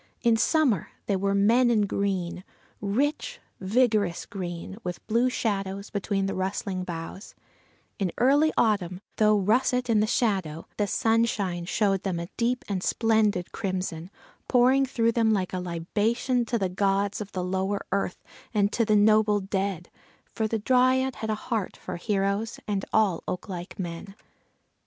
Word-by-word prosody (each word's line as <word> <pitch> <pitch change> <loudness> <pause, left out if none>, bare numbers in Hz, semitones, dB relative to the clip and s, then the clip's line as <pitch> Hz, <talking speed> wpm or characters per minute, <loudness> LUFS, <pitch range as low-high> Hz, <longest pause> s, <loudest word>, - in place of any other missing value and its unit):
In 235 -2 +4
summer 255 - +2 0.2
they 200 - +1
were 195 +1 0
"men 235 +5 +4
in 220 -3 +3
green," 190 -3 -2 0.4
rich, 290 - -1 0.2
vigorous 210 -3 +1
green, 185 -1 -6
with 180 -1 -5
blue 235 +3 +2
shadows 200 -4 -2
between 200 -1 -1
the 195 - -2
rustling 190 0 -2
boughs; 170 +2 -7 0.6
in 190 -4 0
early 285 +5 +4
autumn, 190 -5 +1 0.2
though 215 -1 +4
russet 245 +4 +2
in 215 - +4
the 215 - +2
shadow, 190 -10 0
the 205 - +1
sunshine 210 -6 +1
showed 195 0 +1
them 185 -4 -2
a 170 +1 -6
deep 245 +1 0
and 195 -3 -2
splendid 215 -4 +1
crimson, 185 -4 -3 0.4
pouring 260 +2 +4
through 230 -3 +1
them 225 -1 +2
like 190 -3 -1
a 185 - -1
libation 210 +8 0
to 235 +1 -1
the 195 -4 0
gods 195 +2 0
of 205 -1 -7
the 185 - -2
lower 190 +2 -1
earth, 195 -2 -2 0.3
and 205 0 +2
to 235 - +2
the 215 -1 +2
noble 210 0 +4
dead, 195 -2 -3 0.3
for 220 - -2
the 225 - -1
Dryad 255 +3 +2
had 220 0 -4
a 215 - +1
heart 215 -2 -3
for - - -6
heroes 200 +3 -1
and 200 -2 -1
all 205 -6 +2
oak 180 - -4
like 180 -2 -7
men. 175 +2 -6
205 Hz, 155 wpm, -26 LUFS, 190-230 Hz, 0.6 s, In